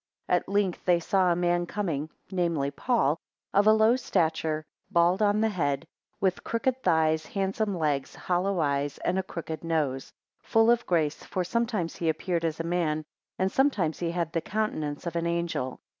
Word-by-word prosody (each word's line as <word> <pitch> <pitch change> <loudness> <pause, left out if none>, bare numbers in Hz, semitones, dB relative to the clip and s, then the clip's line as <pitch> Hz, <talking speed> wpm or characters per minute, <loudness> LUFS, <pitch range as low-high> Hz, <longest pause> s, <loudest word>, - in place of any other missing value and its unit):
7 180 - +4
At - - -15
length 200 -3 0
they 175 -1 +4
saw 185 +1 +2
a - - +3
man 175 0 +1
coming 160 -8 -2 0.2
(namely 170 -6 0
Paul), 165 - +1 0.3
of 205 +1 +4
a - - +9
low 220 +2 +5
stature, 160 -8 0 0.2
bald 175 +1 +3
on 210 0 +3
the 220 - +3
head; 160 -6 -1 0.3
with 185 -2 0
crooked 255 +3 -1
thighs, 160 -3 +2
handsome 195 0 -1
legs, 145 -4 -1
hollow 185 +1 0
eyes; 140 -1 0
and 185 +2 +1
a - - +2
crooked 165 -4 -6
nose; 150 -6 -1 0.3
full 225 +1 +4
of 240 0 +1
grace, 160 -4 +1
for 185 - -2
sometimes 220 -3 -1
he 165 - 0
appeared 170 +2 -1
as 160 -1 -2
a - - -1
man, 165 -3 0 0.4
sometimes 200 - +1
he 170 - -1
had 170 -2 -2
the 165 - 0
countenance 160 -8 -2
of 170 -1 -4
an 170 0 0
angel. 170 -7 -2
175 Hz, 175 wpm, -28 LUFS, 160-200 Hz, 0.4 s, a